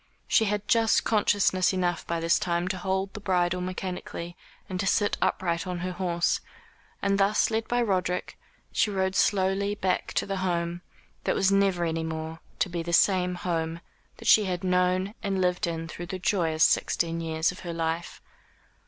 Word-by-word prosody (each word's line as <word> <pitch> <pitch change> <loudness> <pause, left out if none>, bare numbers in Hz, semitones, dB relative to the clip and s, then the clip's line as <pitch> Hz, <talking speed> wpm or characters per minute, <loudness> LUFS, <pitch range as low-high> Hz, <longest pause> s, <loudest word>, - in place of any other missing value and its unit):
She 220 - +4
had 210 0 -2
just 225 -1 +3
consciousness 200 -3 +2
enough 175 -2 -1
by 170 0 -1
this 165 +1 +2
time 175 0 -1
to 190 - -2
hold 190 +1 -1
the - - -6
bridle 180 -2 +1
mechanically, 180 -1 -5 0.3
and 185 -2 -4
to 195 - -1
sit 205 +1 +2
upright 170 -1 0
on 180 -1 -3
her 185 +1 -2
horse; 175 -1 0 0.6
and 200 0 +2
thus 200 +3 +3
led 225 +1 -1
by 245 0 +1
Roderick, 185 -4 -1 0.4
she - - +2
rode 190 -1 -1
slowly 200 +1 +2
back 185 -3 -1
to - - 0
the 195 -1 -3
home 175 -2 -1 0.4
that - - +1
was 195 0 +3
never 195 -3 +2
any 165 0 -1
more 160 0 -5 0.2
to - - +1
be 170 -2 -3
the 170 +1 -4
same 180 0 +3
home 165 -2 -2 0.4
that - - -8
she 215 - +6
had 180 -1 -3
known 185 +2 +1
and 195 -3 -1
lived 180 -1 +1
in 165 -1 -3
through 175 +1 -7
the 185 - -4
joyous 165 -4 +1
sixteen 165 0 +2
years 160 +1 0
of 180 - -11
her 175 - -6
life. 165 +1 -3
180 Hz, 180 wpm, -27 LUFS, 170-195 Hz, 0.6 s, she